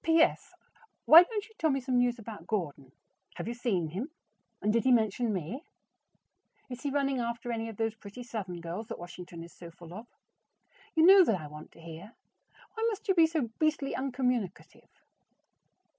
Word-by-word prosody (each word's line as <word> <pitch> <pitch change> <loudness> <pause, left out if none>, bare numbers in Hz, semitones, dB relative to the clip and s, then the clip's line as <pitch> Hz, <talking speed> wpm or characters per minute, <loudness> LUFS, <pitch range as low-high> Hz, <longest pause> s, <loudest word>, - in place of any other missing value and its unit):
P.S. 325 0 +2 0.5
Why 325 +2 +11
don't 420 +3 -3
you 445 - -21
tell 320 - +2
me 275 -1 +1
some 255 -1 0
news 245 0 +2
about 220 -2 -10
Gordon? 145 - -3 0.4
Have - - -5
you 235 - -2
seen 205 -9 -1
him, 205 - -4 0.5
and 210 - +1
did 230 - +2
he 260 - +3
mention 225 0 +2
me? 200 - -4 1.1
Is 250 - -6
he 285 - -2
running 275 -1 0
after 235 0 -3
any 225 -1 -3
of 220 - -10
those 225 -1 0
pretty 220 +2 -10
Southern 190 -7 -6
girls 175 +6 -5
that - - -6
Washington 175 -1 -9
is 170 - -13
so 170 - -11
full 170 0 -13
of? 220 +5 -9 0.9
You 320 0 +5
know 385 +1 +9
that 210 - +1
I 155 - -8
want 150 +1 -11
to - - -18
hear. 170 +7 -10 0.6
Why 445 - -4
must 440 0 -6
you - - +6
be 330 -3 +5
so 310 -8 -2
beastly 305 -3 +1
uncommunicative? 250 -7 -3
235 Hz, 185 wpm, -30 LUFS, 185-275 Hz, 1.1 s, Why